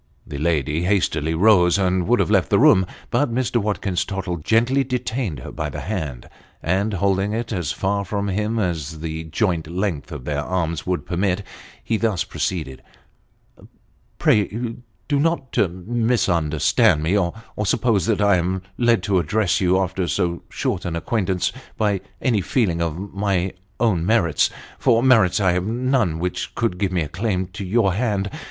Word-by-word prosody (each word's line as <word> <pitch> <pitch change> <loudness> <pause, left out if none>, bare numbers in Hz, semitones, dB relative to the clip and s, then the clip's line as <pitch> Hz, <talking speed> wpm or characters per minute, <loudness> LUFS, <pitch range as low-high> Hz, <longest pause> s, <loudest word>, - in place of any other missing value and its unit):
The 70 - -6
lady 75 -1 0
hastily 80 -5 +1
rose 90 -1 +5
and 95 -2 +1
would 120 +2 +3
have - - +1
left 95 -8 +3
the - - +4
room; 95 -1 +5 0.2
but 120 +1 +1
Mr. 125 0 0
Watkins 100 -4 -1
Tottle 95 -3 -3
gently 115 - +2
detained 120 - -3
her - - -8
by - - -3
the - - -6
hand, 80 - -4 0.4
and 100 +5 0
holding 100 +2 +1
it 115 0 -3
as 85 -6 -2
far 100 +3 -1
from 100 +1 -2
him 105 +3 -1
as 80 -6 -2
the 80 0 -4
joint 85 -1 -1
length 90 -2 -3
of 75 -5 -7
their 75 -1 -1
arms 85 -1 -2
would 90 -1 -1
permit, 95 +2 0 0.4
he 110 - 0
thus 105 -6 0
proceeded, 75 -8 -3 0.7
" - - -25
Pray 115 +3 +1 0.3
do 145 - +1
not 160 -4 0
misunderstand 90 - +2
me, 85 +6 +1
or 90 -4 +1 0.3
suppose 105 0 +1
that 105 -3 +1
I 100 -2 +4
am 90 +2 -1 0.2
led 120 -1 +3
to 95 -2 +2
address 100 +4 +1
you, 90 0 +3
after 95 -1 -1
so 85 0 -1
short - - -2
an 85 - -3
acquaintance, 95 0 -1 0.2
by 100 -3 +1 0.2
any 115 -7 +1
feeling 90 -6 0
of 85 +4 -3
my 95 -2 0 0.3
own 105 -8 +2
merits 85 -7 +2 0.3
tor 115 +1 +3
merits 115 -9 +4
I 95 -3 +3
have 90 +2 -1
none 120 - +1
which 90 +2 -3
could 110 -6 -1
give 95 -2 0
me 90 -3 +1
a - - -4
claim 95 +3 -1
to - - -5
your 95 0 +2
hand. 100 -2 -1
95 Hz, 170 wpm, -22 LUFS, 85-110 Hz, 0.7 s, rose